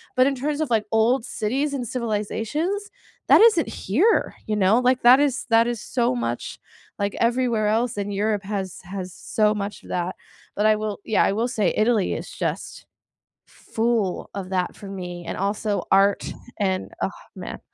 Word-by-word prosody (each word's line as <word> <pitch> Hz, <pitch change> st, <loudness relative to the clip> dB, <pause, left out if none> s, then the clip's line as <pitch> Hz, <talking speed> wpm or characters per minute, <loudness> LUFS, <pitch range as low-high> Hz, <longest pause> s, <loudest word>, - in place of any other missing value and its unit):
But 255 Hz, +1 st, +5 dB
in 275 Hz, -, 0 dB
terms 290 Hz, +3 st, -2 dB
of, 310 Hz, -, -1 dB
like, 220 Hz, -3 st, +1 dB
old 225 Hz, +3 st, +3 dB
cities 275 Hz, +7 st, -1 dB
and 250 Hz, -4 st, -3 dB
civilizations? 250 Hz, -, -2 dB, 0.4 s
That -, -, +7 dB
isn't 435 Hz, -8 st, +5 dB
here, 325 Hz, -, +1 dB
you 215 Hz, -, 0 dB
know? 210 Hz, +3 st, +4 dB
Like, 255 Hz, 0 st, +2 dB
that 250 Hz, +2 st, +8 dB
is 280 Hz, -2 st, +1 dB
that 230 Hz, +1 st, +5 dB
is 240 Hz, -3 st, -3 dB
so 235 Hz, -, 0 dB
much 120 Hz, 0 st, -3 dB, 0.4 s
like, 200 Hz, 0 st, -1 dB
everywhere 235 Hz, -2 st, +1 dB
else, 225 Hz, +1 st, 0 dB
and 205 Hz, 0 st, -3 dB
Europe 210 Hz, 0 st, 0 dB
has 195 Hz, -2 st, -4 dB
has 185 Hz, 0 st, -6 dB
so 210 Hz, +1 st, +1 dB
much 205 Hz, 0 st, -5 dB
of -, -, -14 dB
that. 180 Hz, +1 st, -2 dB, 0.4 s
But 210 Hz, -, +1 dB
I 215 Hz, -, +5 dB
will 210 Hz, -1 st, -4 dB
yeah, 220 Hz, -, +3 dB
I -, -, +2 dB
will 225 Hz, +4 st, 0 dB
say 210 Hz, -7 st, +1 dB
Italy 215 Hz, -2 st, +2 dB
is -, -, -5 dB
just -, -, -4 dB, 0.6 s
full 225 Hz, -4 st, -2 dB
of 190 Hz, -2 st, -5 dB
that 185 Hz, -2 st, -1 dB
for 200 Hz, -, -10 dB
me, 180 Hz, -3 st, -6 dB
and -, -, -4 dB
also 205 Hz, +1 st, -1 dB
art, 195 Hz, +1 st, +3 dB, 0.3 s
and, 190 Hz, -3 st, -1 dB
oh, -, -, +2 dB, 0.3 s
man, -, -, -7 dB
215 Hz, 180 wpm, -23 LUFS, 200-245 Hz, 0.6 s, that